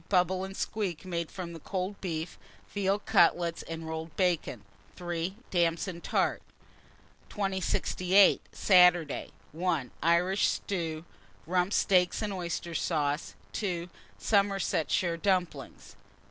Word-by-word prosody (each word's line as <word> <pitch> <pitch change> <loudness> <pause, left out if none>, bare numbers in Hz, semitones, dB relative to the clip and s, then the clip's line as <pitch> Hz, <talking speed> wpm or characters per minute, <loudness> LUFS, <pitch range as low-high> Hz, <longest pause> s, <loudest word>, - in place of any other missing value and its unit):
Bubble 185 0 +2
and 190 0 -7
squeak, 195 -5 -3
made 170 -3 -3
from 175 -3 -7
cold 190 +4 -4
beef; 165 -3 -4 0.3
veal 200 0 +1
cutlets 170 -4 +2
and 165 0 -7
rolled 160 -1 -5
bacon. 170 - 0 0.3
3. 175 +1 -3 0.2
Damson 170 0 0
tart. - - 0 0.9
2068. 190 -1 +2
Saturday. 180 -5 +4 0.2
1. 160 -6 -1
Irish 175 +4 +3
stew, 165 -4 -3 0.4
rump 180 +3 +1
steaks 185 0 +2
and 205 -1 -2
oyster 170 -2 -4
sauce. 150 -2 -1 0.2
2. 180 -4 -3 0.3
Somersetshire 195 -4 +1
dumplings. 185 -1 -2
180 Hz, 105 wpm, -29 LUFS, 165-190 Hz, 0.9 s, Saturday